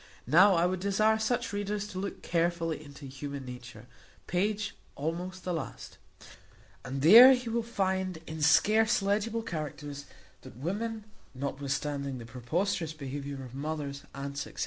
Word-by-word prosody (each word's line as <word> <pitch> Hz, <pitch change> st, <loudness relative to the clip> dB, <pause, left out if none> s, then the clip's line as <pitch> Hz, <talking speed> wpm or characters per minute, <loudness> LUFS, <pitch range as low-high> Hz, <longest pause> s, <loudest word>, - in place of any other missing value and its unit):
Now, 200 Hz, -2 st, +6 dB
I 170 Hz, +1 st, +3 dB
would 185 Hz, 0 st, 0 dB
desire 215 Hz, +3 st, +2 dB
such 220 Hz, 0 st, -1 dB
readers 205 Hz, 0 st, -2 dB
to 185 Hz, -, -5 dB
look 200 Hz, +1 st, -5 dB
carefully 165 Hz, -2 st, 0 dB
into 145 Hz, -1 st, -11 dB
human 140 Hz, 0 st, -6 dB
nature, 125 Hz, -2 st, -10 dB, 0.4 s
page 205 Hz, +3 st, -1 dB, 0.2 s
almost 175 Hz, +5 st, -4 dB
the 180 Hz, -, -2 dB
last, 160 Hz, -5 st, -6 dB, 0.8 s
and 135 Hz, +2 st, -4 dB
there 235 Hz, -, +11 dB
he 250 Hz, -2 st, -5 dB
will 235 Hz, +1 st, 0 dB
find, 190 Hz, -5 st, -1 dB
in 160 Hz, -1 st, -6 dB
scarce 215 Hz, +8 st, +4 dB
legible 215 Hz, +3 st, 0 dB
characters, 145 Hz, -4 st, -5 dB, 0.4 s
that -, -, -13 dB
women, 215 Hz, -, -3 dB, 0.3 s
notwithstanding 140 Hz, 0 st, -3 dB
the 120 Hz, -, -8 dB
preposterous 160 Hz, -, -2 dB
behaviour 140 Hz, -1 st, -6 dB
of 125 Hz, -, -12 dB
mothers, 140 Hz, 0 st, -4 dB
aunts, 140 Hz, 0 st, -4 dB
&c. -, -, -7 dB
165 Hz, 145 wpm, -30 LUFS, 140-205 Hz, 0.8 s, there